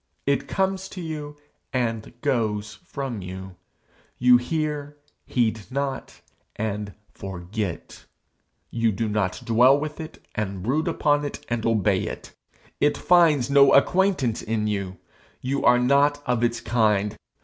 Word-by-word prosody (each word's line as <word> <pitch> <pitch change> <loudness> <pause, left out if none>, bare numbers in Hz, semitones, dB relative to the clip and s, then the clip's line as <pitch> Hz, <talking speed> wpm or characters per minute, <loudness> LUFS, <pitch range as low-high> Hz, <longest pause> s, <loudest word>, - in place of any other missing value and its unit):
It 140 - 0
comes 190 0 -1
to - - -3
you 150 -3 -6 0.3
and 120 -2 -2
goes 110 -6 -1
from 135 -7 -4
you. 95 0 -8 0.6
You 125 0 +6
hear, 150 +2 -3 0.3
heed 110 -4 0
not, 135 0 -4 0.3
and 105 -2 -3 0.2
forget. 95 0 -6 0.7
You 115 -1 +1
do 110 +3 -2
not 105 +1 -1
dwell 125 +4 +5
with 150 +1 -5
it, 160 0 -9
and 100 -3 -3
brood 150 - 0
upon 145 -3 +2
it, 145 - -6
and 120 -1 -1
obey 105 -4 +2
it. - - -8 0.5
It 145 - +2
finds 155 -7 +4
no 140 0 +6
acquaintance 175 - +2
in 110 -1 -1
you. 100 -3 -3 0.4
You 135 +2 -2
are 125 - +6
not 140 +3 +3
of 120 -1 0
its 120 -1 0
kind. 105 -3 +1
120 Hz, 135 wpm, -24 LUFS, 105-145 Hz, 0.7 s, You